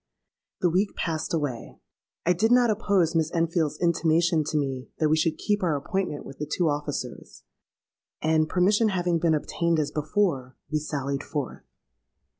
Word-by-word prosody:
The 180 Hz, -, +4 dB
week 195 Hz, +4 st, +1 dB
passed 160 Hz, -2 st, -2 dB
away: 145 Hz, -8 st, -3 dB, 0.5 s
I 180 Hz, -, +4 dB
did 220 Hz, +7 st, +1 dB
not 245 Hz, -2 st, +5 dB
oppose 200 Hz, -6 st, +1 dB
Miss 160 Hz, -1 st, +1 dB
Enfield's 165 Hz, -3 st, 0 dB
intimation 170 Hz, -1 st, +2 dB
to 155 Hz, -, -1 dB
me 135 Hz, -3 st, -2 dB
that 155 Hz, -, +2 dB
we 155 Hz, -, +4 dB
should 160 Hz, 0 st, +1 dB
keep 205 Hz, -1 st, 0 dB
our 170 Hz, -5 st, +1 dB
appointment 150 Hz, +2 st, -3 dB
with 135 Hz, -, -11 dB
the 150 Hz, -, -4 dB
two 175 Hz, -3 st, +2 dB
officers; 145 Hz, -4 st, -5 dB, 0.8 s
and, 155 Hz, 0 st, +2 dB
permission 205 Hz, +5 st, +3 dB
having 175 Hz, -3 st, 0 dB
been 160 Hz, -1 st, +3 dB
obtained 170 Hz, +2 st, 0 dB
as 150 Hz, -2 st, 0 dB
before, 150 Hz, -5 st, -1 dB
we 155 Hz, -, +1 dB
sallied 140 Hz, -2 st, -3 dB
forth. 145 Hz, -4 st, -4 dB
160 Hz, 160 wpm, -26 LUFS, 150-180 Hz, 0.8 s, not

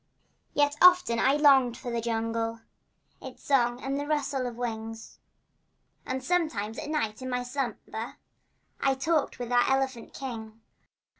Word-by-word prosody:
Yet 290 Hz, 0 st, +3 dB
often 360 Hz, -10 st, +6 dB
I 270 Hz, -, +4 dB
longed 270 Hz, -5 st, +5 dB
for 250 Hz, -2 st, -6 dB
the 235 Hz, 0 st, -1 dB
jungle— 225 Hz, 0 st, -2 dB, 0.6 s
Its -, -, -10 dB
song 245 Hz, -3 st, +2 dB
and 275 Hz, +1 st, -1 dB
the 290 Hz, -, -4 dB
rustle 280 Hz, -4 st, -1 dB
of 240 Hz, -, -6 dB
wing— 225 Hz, -2 st, -4 dB, 1.1 s
And 260 Hz, 0 st, -3 dB
sometimes 260 Hz, -, -1 dB
at -, -, -6 dB
night 230 Hz, -7 st, -2 dB
in 255 Hz, -, -4 dB
my 250 Hz, 0 st, -1 dB
slumber 245 Hz, -3 st, -4 dB, 0.6 s
I 270 Hz, -1 st, +2 dB
talked 310 Hz, +3 st, 0 dB
with 245 Hz, -1 st, -5 dB
our 245 Hz, 0 st, +4 dB
elephant 265 Hz, -3 st, -1 dB
king. 225 Hz, -4 st, -7 dB
250 Hz, 145 wpm, -28 LUFS, 230-275 Hz, 1.1 s, often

